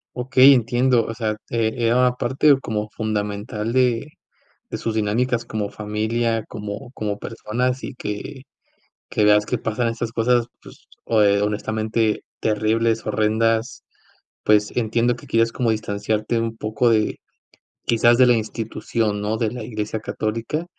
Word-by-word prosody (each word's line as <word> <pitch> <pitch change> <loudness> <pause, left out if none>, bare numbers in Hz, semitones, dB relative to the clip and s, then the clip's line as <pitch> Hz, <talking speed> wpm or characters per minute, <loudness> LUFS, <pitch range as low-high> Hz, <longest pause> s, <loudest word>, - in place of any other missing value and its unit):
Okey, 130 +2 +6
entiendo, 120 0 +2
o 115 - -5
sea, 110 -2 -2
eh, 115 -1 0
era 120 0 +2
una 125 0 +3
parte 135 +3 +3
como 105 -2 -3
fundamental 105 +1 -3
de 125 +2 +1 0.6
de - - -3
sus 115 -1 -3
dinámicas 115 +3 0
como 105 -2 -3
familia, 110 +2 -1
como 105 +4 -7
como 105 -1 -3
personas, 125 +4 -2
y 135 - -6
que 115 +4 -6 0.7
que 105 - +1
veas 105 0 +5
que 125 - -1
pasan 115 +2 -1
estas 115 0 -3
cosas, 120 0 +2 0.2
pues - - -16 0.2
ho 110 -2 +3
eh, 100 0 +4
honestamente 110 +1 -1 0.2
terribles, 110 +1 +1
horrendas, 110 +2 0 0.6
pues 105 -1 +3
entiendo 120 +1 +1
que - - -14
quieres 115 0 +2
como 120 -3 0
distanciarte 110 +2 -1
un 115 0 -3
poco 110 +3 +1
de 110 -1 +1 0.7
quizás 120 +1 +4
de 130 - +7
la 120 - +6
institución, 110 -1 -2
¿no?, 110 +2 -1
de 110 -2 0
la 120 -3 -6
Iglesia 110 -1 -4
católica. 115 +12 -3
115 Hz, 145 wpm, -22 LUFS, 105-120 Hz, 0.7 s, de